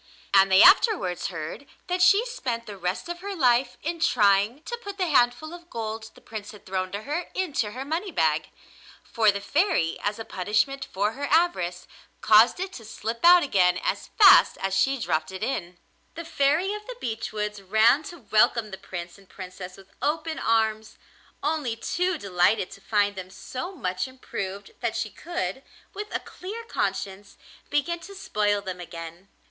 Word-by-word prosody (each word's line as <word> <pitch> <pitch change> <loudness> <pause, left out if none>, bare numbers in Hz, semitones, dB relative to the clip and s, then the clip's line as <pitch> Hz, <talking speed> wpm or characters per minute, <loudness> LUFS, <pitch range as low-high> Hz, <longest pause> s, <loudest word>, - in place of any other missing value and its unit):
And 195 -1 +6
they 190 - +8
afterwards 370 - +4
heard 170 - -7 0.2
that 360 0 -1
she 395 +5 +5
spent 250 - -4
the 205 - -8
rest 185 - -3
of 345 0 -5
her 395 +2 -5
life 250 -4 +2
in 335 +2 -3
trying 210 0 +3
to 475 - -4
put 405 -3 -7
the 375 - 0
handful 275 +1 +2
of 345 0 -12
gold 220 -1 -5
the - - -17
Prince 215 -1 -8
had 210 - -15
thrown 185 -1 -3
to 205 +2 -4
her 305 +7 -3
into 285 - -1
her 260 +2 -6
money 330 +7 -2
bag. 160 - +1 0.5
For 220 -3 +2
the 200 0 +1
Fairy, 285 - +1
as 205 0 -1
a 225 - -7
punishment 215 +8 -1
for 205 +3 0
her 280 +5 -5
avarice, 285 - +1 0.3
caused 220 +8 +5
it 380 0 -4
to 230 - -9
slip 225 +2 -5
out 350 0 +8
again 180 -9 +3
as - - -2
fast 405 -3 +8
as 195 0 -1
she 270 +8 +2
dropped 155 -8 -1
it 190 +2 -6
in. 180 -8 -3 0.4
The 335 +1 -6
Fairy 325 +5 +1
of 420 0 -8
the - - -7
Beech 225 - -4
Woods 210 -1 -4
ran 220 +8 +4
to 350 -3 -8
welcome 215 0 +3
the 190 - -6
Prince 175 +1 -8
and 195 - -21
Princess 185 -1 -9
with 195 -1 -17
open 315 +2 -1
arms, 220 -1 0 0.5
only 295 -6 -1
too 360 +9 -1
delighted 190 -2 +1
to 195 - -12
find 205 -1 +1
them 185 -1 -7
so 255 - -7
much 185 - -2
improved 200 -6 -6
that 235 -2 -2
she 225 -2 -3
could, 265 - -4 0.3
with 420 +1 -5
a - - -1
clear 420 +6 -8
conscience, 195 - -4 0.3
begin 335 +4 0
to 395 +4 -11
spoil 205 - 0
them 185 -2 -6
again. 170 +1 -9
225 Hz, 180 wpm, -25 LUFS, 195-325 Hz, 0.5 s, they